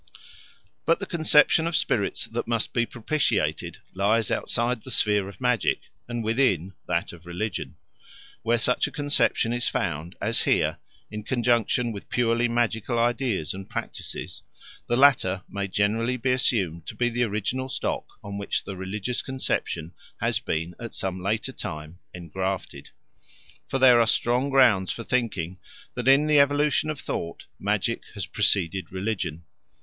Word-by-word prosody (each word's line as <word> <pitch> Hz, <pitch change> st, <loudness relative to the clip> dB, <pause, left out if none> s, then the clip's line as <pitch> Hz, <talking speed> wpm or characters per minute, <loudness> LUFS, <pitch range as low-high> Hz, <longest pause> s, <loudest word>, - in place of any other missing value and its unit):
But 165 Hz, -, +2 dB
the 200 Hz, -, -3 dB
conception 160 Hz, -1 st, +4 dB
of 170 Hz, -, -1 dB
spirits -, -, +1 dB
that -, -, -4 dB
must 115 Hz, -1 st, 0 dB
be 120 Hz, -1 st, +1 dB
propitiated 130 Hz, +5 st, -1 dB, 0.2 s
lies 105 Hz, +3 st, +2 dB
outside 120 Hz, 0 st, 0 dB
the 130 Hz, -, -9 dB
sphere 105 Hz, -4 st, +2 dB
of 100 Hz, -, -13 dB
magic, 125 Hz, -4 st, +1 dB, 0.3 s
and 120 Hz, -1 st, -3 dB
within 110 Hz, -, +1 dB
that -, -, -1 dB
of 85 Hz, 0 st, -14 dB
religion. 90 Hz, +3 st, -4 dB, 0.7 s
Where 115 Hz, +1 st, +2 dB
such 125 Hz, +2 st, +2 dB
a -, -, -8 dB
conception 145 Hz, -5 st, +2 dB
is 120 Hz, 0 st, +1 dB
found, 85 Hz, 0 st, -2 dB
as 115 Hz, +2 st, +1 dB
here, -, -, +1 dB, 0.3 s
in 105 Hz, 0 st, -5 dB
conjunction 120 Hz, 0 st, +1 dB
with 100 Hz, -2 st, -8 dB
purely 120 Hz, 0 st, +2 dB
magical 120 Hz, 0 st, 0 dB
ideas 120 Hz, -, 0 dB
and 95 Hz, 0 st, -9 dB
practices, -, -, -5 dB, 0.5 s
the 120 Hz, -, +1 dB
latter 115 Hz, -10 st, +4 dB
may 100 Hz, 0 st, -3 dB
generally 110 Hz, +6 st, +1 dB
be 125 Hz, +1 st, 0 dB
assumed 100 Hz, -, +1 dB
to -, -, -6 dB
be 120 Hz, -, +1 dB
the 120 Hz, +1 st, -2 dB
original 115 Hz, +5 st, -2 dB
stock -, -, -2 dB, 0.2 s
on 100 Hz, 0 st, -5 dB
which 100 Hz, -, -1 dB
the 95 Hz, -, -6 dB
religious 100 Hz, +6 st, -3 dB
conception 90 Hz, -10 st, -2 dB, 0.3 s
has -, -, +1 dB
been 80 Hz, +2 st, -3 dB
at 115 Hz, -1 st, -7 dB
some 95 Hz, -1 st, -2 dB
later 110 Hz, +7 st, -1 dB
time 80 Hz, -6 st, -7 dB
engrafted. 95 Hz, +2 st, -4 dB, 0.8 s
For 135 Hz, -, -1 dB
there 130 Hz, -2 st, +7 dB
are 115 Hz, -, +3 dB
strong 125 Hz, +5 st, +2 dB
grounds 120 Hz, -9 st, +4 dB
for 115 Hz, -, -5 dB
thinking 100 Hz, -9 st, -1 dB, 0.3 s
that, 125 Hz, 0 st, -4 dB
in 135 Hz, +3 st, +6 dB
the 150 Hz, -1 st, +5 dB
evolution 145 Hz, +2 st, +3 dB
of 155 Hz, -2 st, -3 dB
thought, 85 Hz, -10 st, -5 dB
magic -, -, 0 dB
has -, -, -3 dB
preceded 95 Hz, 0 st, +1 dB
religion. 95 Hz, -4 st, -3 dB
115 Hz, 155 wpm, -26 LUFS, 95-125 Hz, 0.8 s, there